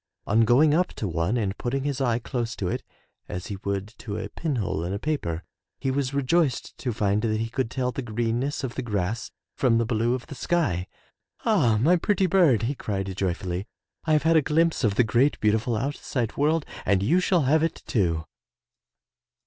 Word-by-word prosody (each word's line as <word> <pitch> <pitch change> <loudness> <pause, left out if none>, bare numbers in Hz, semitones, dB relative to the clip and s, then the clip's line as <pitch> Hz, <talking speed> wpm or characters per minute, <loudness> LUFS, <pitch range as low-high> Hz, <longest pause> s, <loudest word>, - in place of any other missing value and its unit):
On 115 +2 +3
going 145 +7 +5
up 180 +3 +3
to 105 - -3
one 85 +7 0
and 100 -4 -1
putting 135 +2 -1
his 140 -1 -2
eye 120 -3 +2
close 120 -1 -3
to 95 - -3
it - - -2 0.5
as 90 0 -5
he - - -5
would 100 0 -3
to 105 -2 -5
a - - -4
pinhole 115 - -2
in 90 +3 -3
a - - -1
paper, 100 - -2 0.4
he 135 - 0
was 135 -1 -1
rejoiced 140 0 +1
to 125 - -2
find 105 -1 +1
that 110 -1 0
he 115 +1 -2
could 125 -1 -1
tell 125 0 -1
the 135 - -4
greenness 120 +4 -1
of 125 -2 -3
the - - -3
grass 105 -2 -2 0.3
from 120 -3 +3
the 115 - +2
blue 115 +1 +1
of 125 - -6
the 155 - -9
sky. 135 - 0 0.6
"Ah, 150 - +3
my 165 +10 +4
pretty 195 +2 +1
bird,'* 165 - +4
he 125 +5 0
cried 95 -7 -3
joyfully, 90 0 -2 0.4
"I 155 - +1
have 150 -2 +3
had 165 0 +4
a - - +5
glimpse 160 +1 +1
of 105 -3 +2
the 125 - +5
great, 120 +6 +2
beautiful 110 +3 +1
outside 125 -2 -2
world 155 +2 +2 0.2
and 100 -1 +2
you 160 - +3
shall 180 -3 +2
have 150 +4 +3
it 165 0 -2
too.'' 85 - 0
120 Hz, 200 wpm, -26 LUFS, 105-145 Hz, 0.6 s, going